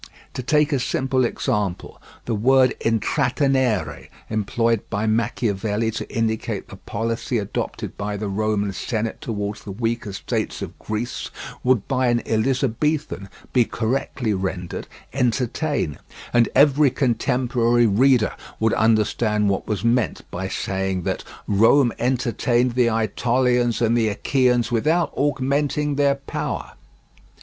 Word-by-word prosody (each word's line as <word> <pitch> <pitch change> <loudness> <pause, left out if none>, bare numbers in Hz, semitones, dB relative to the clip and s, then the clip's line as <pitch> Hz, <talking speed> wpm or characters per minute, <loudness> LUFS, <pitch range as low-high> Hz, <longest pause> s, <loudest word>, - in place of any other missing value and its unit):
To - - -4
take 150 +3 +2
a 140 - +2
single 130 0 +1
example: 105 -5 -2 0.2
the 120 - -1
word 130 +4 +4
intrattenere, 125 +1 +1 0.2
employed 115 +1 +1
by 100 +2 -1
Machiavelli 110 -1 0
to 115 - -6
indicate 110 -1 -2
the - - -10
policy 115 +3 -2
adopted 100 -3 -4
by 105 0 -3
the 105 +1 -3
Roman 105 0 0
Senate 110 +2 -3
towards 105 -2 -4
the 100 - -7
weaker 115 +1 -2
states 95 - -3
of - - -8
Greece, 110 +3 -4 0.3
would 125 -5 +2
by 130 -2 +1
an 120 -1 +1
Elizabethan 130 0 0 0.2
be 125 - +5
correctly 115 0 -1
rendered 95 -2 -4 0.3
"entertain," 125 - 0 0.3
and 120 -1 +4
every 145 +1 +5
contemporary 120 -2 +1
reader 115 +2 +3 0.3
would 110 0 +2
understand 110 -1 +2
what 95 - -1
was 105 -2 -2
meant 120 -2 +1
by 95 +2 -3
saying 95 -1 -2
that - - -2 0.2
"Rome 115 +5 +4
entertained 125 0 +1
the 125 -1 +3
Ætolians 120 +2 +1
and 115 +1 +2
the 115 -2 +2
Achaeans 125 +3 +1
without 155 +9 +1
augmenting 145 +1 0
their 140 0 +3
power." 140 0 -4
115 Hz, 125 wpm, -22 LUFS, 105-130 Hz, 0.3 s, be